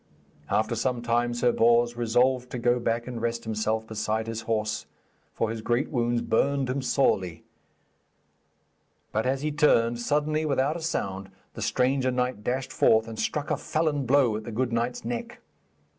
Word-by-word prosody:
After 110 +2 +1
some 120 +1 -1
time 120 0 +1
Sir 120 0 +2
Bors 120 +1 +3
resolved 125 +2 +1
to - - -5
go 120 +1 +2
back 115 0 -1
and 120 -2 -6
rest 115 0 -2
himself 110 0 -1
beside 110 0 -2
his 115 0 -4
horse, 110 -1 -1 0.4
for 110 - -1
his 115 -1 -5
great 120 +4 0
wounds 120 -3 0
burned 135 +2 +1
him 135 +1 -2
sorely; 95 - +1 1.7
but 110 +4 0
as 135 +2 -1
he 155 - 0
turned, 120 -6 +3
suddenly, 150 +4 0
without 140 0 +1
a 170 - -5
sound, 95 -11 -3 0.2
the - - -8
stranger 130 +1 +1
knight 125 -3 -1
dashed 130 +3 -2
forth, 110 0 +4
and 115 -1 -7
struck 150 0 -2
a - - +1
felon 150 -4 -1
blow 130 -4 +4
at 110 - -4
the 115 - -7
good 120 +2 -1
knight's 120 0 -2
neck. 120 0 -4
120 Hz, 170 wpm, -26 LUFS, 110-130 Hz, 1.7 s, forth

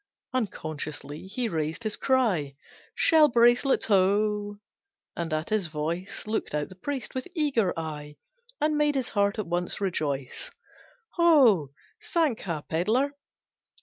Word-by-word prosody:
Unconsciously 155 - -4
he 235 +5 -2
raised 160 +1 -3
his 215 -1 0
cry, 205 - +1 0.4
"Shell 315 -2 +6
bracelets 240 +3 +4
ho!" 205 +1 +2 0.6
And 170 -1 -3
at 155 0 -2
his 210 -5 +1
voice 165 +5 -4
Looked 215 -7 -2
out 150 -1 -2
the 185 - -12
priest, 260 +4 -4
with 260 +4 -4
eager 270 - +1
eye, 150 -2 -6 0.4
And 300 0 +1
made 295 -1 +2
his 265 -3 -1
heart 200 0 +1
at 215 - -2
once 175 +1 -2
rejoice. 145 -9 -3 0.7
"Ho, 265 - +5 0.3
Sankha 220 - -1
pedlar! 220 - +1
205 Hz, 125 wpm, -27 LUFS, 160-255 Hz, 0.7 s, Shell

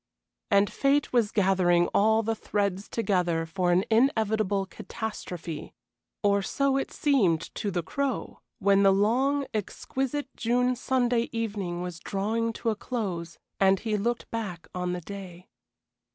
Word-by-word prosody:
And 200 -1 +4
fate 275 +4 +1
was 230 -4 +3
gathering 185 -3 +3
all 220 +2 +4
the 225 +1 0
threads 200 -2 -2
together 180 -7 0
for 175 +2 0
an 180 +2 +3
inevitable 220 -4 +2
catastrophe, 180 -6 -6 0.5
or 200 0 +3
so 275 +6 +1
it 270 - -1
seemed 195 - +1
to 205 - -2
the 175 -3 -2
Crow 275 - -3 0.2
when 200 -2 +4
the 195 -1 +6
long, 255 +8 +2
exquisite 265 +6 -3
June 250 +2 +1
Sunday 245 -1 +1
evening 200 -6 -3
was 180 -2 -6
drawing 220 +5 -1
to 225 - -1
a - - -2
close 190 -8 -4 0.2
and 195 -1 +4
he 220 -2 -1
looked 235 +4 -2
back 200 -7 -4
on 180 0 -2
the 180 - -4
day. 185 -1 -9
205 Hz, 140 wpm, -27 LUFS, 185-235 Hz, 0.5 s, the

